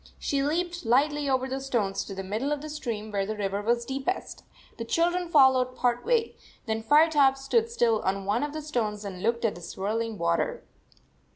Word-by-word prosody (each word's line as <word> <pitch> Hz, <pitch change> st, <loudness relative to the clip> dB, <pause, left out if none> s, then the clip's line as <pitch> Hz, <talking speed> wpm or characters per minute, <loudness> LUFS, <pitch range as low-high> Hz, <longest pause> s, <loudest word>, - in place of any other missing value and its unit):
She 280 Hz, -1 st, -1 dB
leaped 345 Hz, +4 st, -1 dB
lightly 285 Hz, +4 st, +2 dB
over 260 Hz, -1 st, +1 dB
the 265 Hz, +1 st, -4 dB
stones 225 Hz, -8 st, -1 dB
to 195 Hz, -, -7 dB
the 195 Hz, -, -5 dB
middle 220 Hz, +9 st, -2 dB
of 295 Hz, -1 st, -1 dB
the 310 Hz, -, -6 dB
stream, 225 Hz, -7 st, -5 dB
where 200 Hz, -1 st, 0 dB
the 215 Hz, +2 st, -4 dB
river 200 Hz, 0 st, -2 dB
was 235 Hz, +2 st, 0 dB
deepest. 270 Hz, +8 st, -4 dB, 0.3 s
The 230 Hz, -, -4 dB
children 345 Hz, +7 st, 0 dB
followed 260 Hz, -4 st, +4 dB
part 245 Hz, -1 st, 0 dB
way; 465 Hz, -1 st, +1 dB, 0.3 s
then 220 Hz, -1 st, -2 dB
Firetop 290 Hz, +1 st, +4 dB
stood 450 Hz, -, +1 dB
still 230 Hz, -, +2 dB
on 195 Hz, +1 st, -1 dB
one 205 Hz, +4 st, +1 dB
of 295 Hz, 0 st, -2 dB
the 310 Hz, 0 st, -5 dB
stones 215 Hz, -8 st, -2 dB
and 185 Hz, -2 st, -6 dB
looked 235 Hz, +2 st, 0 dB
at 220 Hz, -, +1 dB
the 175 Hz, -, -11 dB
swirling 215 Hz, +5 st, -3 dB
water. 85 Hz, -, 0 dB
250 Hz, 195 wpm, -27 LUFS, 215-295 Hz, 0.3 s, followed